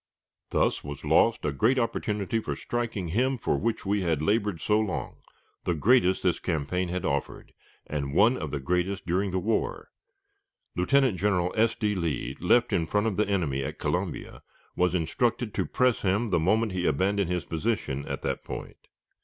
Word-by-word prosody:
Thus - - +1
was 70 -1 -7
lost - - +3
a 75 - +1
great 110 - +2
opportunity 110 -3 -1
for - - -4
striking 115 -7 -3
him 130 +9 +1
for - - 0
which 115 -2 -2
we 100 +1 +1
had 85 -5 0
labored 100 +1 0
so 105 +6 +2
long 110 -4 -3 0.5
the 90 - 0
greatest 95 - +3
this 90 - +2
campaign 90 +2 -1
had 90 0 -3
offered, - - -3 0.3
and 70 -1 -3
one 110 +7 +5
of 80 - -4
the 70 - -3
greatest 90 +7 -1
during 95 +3 0
the 95 - -1
war. 110 +5 -1 0.9
Lieutenant 135 -9 +2
General 90 -2 +1
S. 115 +1 +3
D. 105 -2 0
Lee, 75 -8 -2
left 120 +7 +3
in 80 -2 +1
front 105 +4 +1
of 110 -4 0
the 105 +1 +1
enemy 80 -10 0
at - - -5
Columbia, - - -3 0.3
was 90 0 +2
instructed 115 +6 0
to - - -1
press 125 -3 +2
him 105 +4 +1
the 90 - +2
moment 110 +6 +2
he 90 -1 -1
abandoned 95 +5 +1
his 90 -2 -1
position 80 -6 -2
at - - -4
that - - -2
point. - - -8
95 Hz, 180 wpm, -27 LUFS, 85-110 Hz, 0.9 s, one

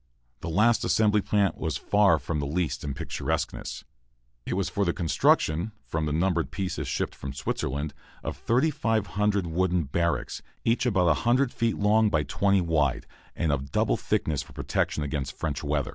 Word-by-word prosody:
The - - -5
last 110 +8 +3
assembly 105 -1 +3
plant 100 -1 +1
was 80 -5 -1
far 100 -5 +4
from 75 0 -3
least 75 0 -2
in 70 -2 -3
picturesqueness. - - -3 0.6
It - - -1
was 95 0 0
for 100 - -1
the 85 -3 +1
construction, 85 +2 +2
from 80 -1 -2
numbered 85 -5 +1
pieces 95 +4 -3
shipped - - -2
from 65 0 -7
Switzerland, 70 +2 -3 0.3
of - - -3
3,500 110 - +1
wooden 90 +1 +1
barracks, 85 +4 -1 0.2
each 115 +2 +2
about 95 -6 +2
100 120 - +2
feet 115 -2 0
long 105 +1 +4
by 75 -5 +1
20 100 +7 +2
wide, 75 -6 +1 0.3
and 80 - 0
of 70 -1 -2
double - - +2
thickness 75 -3 -1
for - - -13
protection 75 - -1
against 70 -2 -3
French 75 -4 -3
weather. 75 -2 -1
85 Hz, 160 wpm, -27 LUFS, 75-105 Hz, 0.6 s, far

